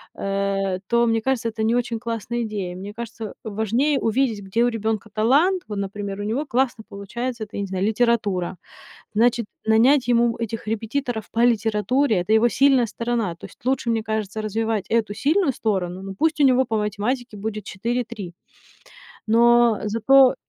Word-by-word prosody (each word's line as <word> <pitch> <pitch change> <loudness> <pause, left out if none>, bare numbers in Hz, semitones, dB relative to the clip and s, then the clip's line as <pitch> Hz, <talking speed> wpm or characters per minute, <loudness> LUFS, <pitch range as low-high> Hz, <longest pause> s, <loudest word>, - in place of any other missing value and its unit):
э, 195 -1 -1
то, 235 0 +3
мне 225 -1 +1
кажется, 255 -2 0
это 220 0 -4
не 230 +2 +2
очень 235 -2 -1
классная 235 +1 -3
идея. 200 -5 -4
Мне 200 +3 -7
кажется, 225 -2 -7
важнее 230 +7 0
увидеть, 225 -2 0
где 230 +5 +1
у 245 - +3
ребёнка 220 -1 -2
талант. 295 - +3
Вот, 205 -2 -4
например, 200 0 -4
у - - -3
него 240 +9 -1
классно 240 -3 0
получается, 230 +4 -5
это, - - -23
я - - -1
не 200 - -3
знаю, 190 +1 -2
литература. 215 -6 0 0.6
Значит, 235 0 +2 0.2
нанять 245 +5 +4
ему 235 -1 +3
этих 225 -1 -4
репетиторов 225 +1 -3
по 230 - -1
литературе- 225 +2 +2
это 205 +5 -1
его 230 +2 +5
сильная 265 -1 +4
сторона, 230 -5 -2
то - - -10
есть - - -20
лучше, 260 -3 +1
мне 225 -1 0
кажется, 215 -1 -3
развивать 220 -1 -1
эту 220 -3 +1
сильную 300 - +2
сторону, 190 -5 -2
но 195 0 -7
пусть 315 -1 +1
у - - +6
него 260 0 +5
по 220 -2 -1
математике 215 +3 -2
будет 215 0 -5
4-3 225 -2 -4 0.9
но, 235 0 +5
э, - - -1
зато 260 +5 +5
225 Hz, 175 wpm, -23 LUFS, 205-240 Hz, 0.9 s, у